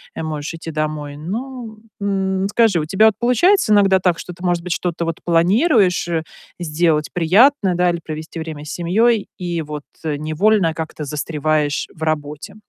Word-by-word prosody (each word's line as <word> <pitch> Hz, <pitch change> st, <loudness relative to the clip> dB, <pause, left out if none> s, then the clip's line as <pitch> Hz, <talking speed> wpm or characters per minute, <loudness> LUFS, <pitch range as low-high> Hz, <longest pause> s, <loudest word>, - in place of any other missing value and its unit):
э, -, -, -4 dB
можешь 155 Hz, 0 st, -4 dB
идти 165 Hz, 0 st, -7 dB
домой. 150 Hz, -2 st, -3 dB
Ну, 225 Hz, -, -6 dB, 0.2 s
м. 195 Hz, -1 st, 0 dB
Скажи, 220 Hz, -5 st, +3 dB
у 155 Hz, -, -2 dB
тебя 195 Hz, +6 st, +4 dB
вот 220 Hz, -, +2 dB
получается 250 Hz, -, +3 dB
иногда 195 Hz, -2 st, +5 dB
так, 180 Hz, -2 st, +1 dB
что 180 Hz, -, -7 dB
ты, 175 Hz, -, -14 dB
может 175 Hz, -1 st, 0 dB
быть, 180 Hz, -1 st, -1 dB
что-то 170 Hz, -1 st, -2 dB
вот 165 Hz, -1 st, -4 dB
планируешь, 185 Hz, -, +3 dB
э, 165 Hz, -2 st, -1 dB, 0.4 s
сделать 155 Hz, -2 st, +1 dB
приятное, 195 Hz, -, +4 dB
да, 180 Hz, 0 st, +2 dB
или 170 Hz, -1 st, -1 dB
провести 155 Hz, +1 st, -7 dB
время 155 Hz, -2 st, -6 dB
с 150 Hz, -, -6 dB
семьей, 210 Hz, +5 st, +1 dB
и 175 Hz, -2 st, -3 dB
вот 150 Hz, -1 st, -6 dB, 0.2 s
невольно 160 Hz, +5 st, +1 dB
как-то 160 Hz, -1 st, -6 dB
застреваешь 150 Hz, 0 st, -1 dB
в 160 Hz, -, -19 dB
работе? 150 Hz, 0 st, -3 dB
170 Hz, 170 wpm, -19 LUFS, 155-200 Hz, 0.4 s, иногда